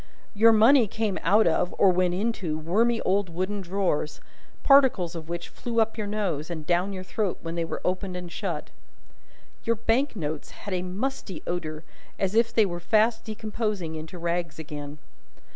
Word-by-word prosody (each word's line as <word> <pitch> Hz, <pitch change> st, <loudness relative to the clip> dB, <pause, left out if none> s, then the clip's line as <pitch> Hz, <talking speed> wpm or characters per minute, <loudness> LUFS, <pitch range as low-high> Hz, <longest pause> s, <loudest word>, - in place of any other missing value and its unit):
Your 225 Hz, +2 st, +6 dB
money 225 Hz, +3 st, +6 dB
came 210 Hz, -1 st, -2 dB
out 210 Hz, +6 st, +4 dB
of, 170 Hz, +2 st, +1 dB
or 195 Hz, -, +6 dB
went 180 Hz, 0 st, +1 dB
into, 195 Hz, -6 st, -1 dB
wormy 220 Hz, +9 st, +2 dB
old 195 Hz, 0 st, +1 dB
wooden 185 Hz, +4 st, -2 dB
drawers, 180 Hz, -5 st, -1 dB, 0.4 s
particles 265 Hz, -, +5 dB
of 165 Hz, -1 st, -7 dB
which 170 Hz, 0 st, -4 dB
flew 235 Hz, -1 st, -3 dB
up 220 Hz, 0 st, +2 dB
your 215 Hz, -2 st, -3 dB
nose 190 Hz, -8 st, -2 dB
and 160 Hz, -3 st, -5 dB
down 180 Hz, +4 st, +1 dB
your 185 Hz, -1 st, -5 dB
throat 195 Hz, 0 st, -2 dB
when 165 Hz, 0 st, -4 dB
they 170 Hz, 0 st, -1 dB
were 165 Hz, -, -5 dB
opened 185 Hz, 0 st, -1 dB
and 180 Hz, -1 st, -7 dB
shut. -, -, -4 dB, 0.9 s
Your 230 Hz, -, +1 dB
bank 230 Hz, +5 st, +1 dB
notes 155 Hz, -5 st, -4 dB
had 200 Hz, -, -7 dB
a 180 Hz, -, 0 dB
musty 190 Hz, -, -4 dB
odour, 160 Hz, -3 st, -3 dB, 0.3 s
as 195 Hz, 0 st, 0 dB
if 230 Hz, +1 st, +3 dB
they 225 Hz, -2 st, +4 dB
were 175 Hz, -2 st, -4 dB
fast 220 Hz, +4 st, +2 dB
decomposing 215 Hz, -5 st, -3 dB
into 160 Hz, +3 st, -7 dB
rags 170 Hz, -1 st, -2 dB
again. 150 Hz, -2 st, -7 dB
185 Hz, 175 wpm, -26 LUFS, 170-220 Hz, 0.9 s, Your